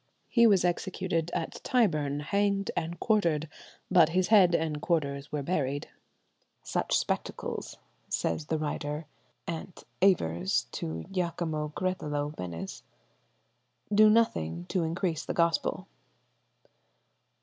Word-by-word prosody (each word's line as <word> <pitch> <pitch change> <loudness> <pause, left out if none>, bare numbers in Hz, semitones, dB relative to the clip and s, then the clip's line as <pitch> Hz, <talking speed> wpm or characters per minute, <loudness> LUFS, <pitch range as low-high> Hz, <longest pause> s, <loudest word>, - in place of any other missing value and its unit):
He 235 -2 +6
was 195 -4 +4
executed 175 -2 -1
at - - -4
Tyburn, 155 - +1
hanged 200 +4 0
and 170 0 -3
quartered, 170 -8 +2 0.4
but 170 -4 +6
his 180 +2 +1
head 190 -6 +6
and 155 -2 -1
quarters 140 -4 -1
were 150 -2 -2
buried. 145 -3 -1 0.7
"Such - - 0
spectacles," - - -3 0.3
says 150 - -1
the 160 - 0
writer, 150 0 -3 0.4
Ant. 170 +2 -6 0.2
Aivers, 110 - +2
to 80 0 -4
Giacomo 165 -4 -2
Creleto, 150 -5 -2
Venice, 90 +1 -6 1.1
"do 215 +1 +7
nothing 85 - +1
increase 170 -1 0
the - - -4
gospel. 170 -1 +1
165 Hz, 105 wpm, -29 LUFS, 145-185 Hz, 1.1 s, do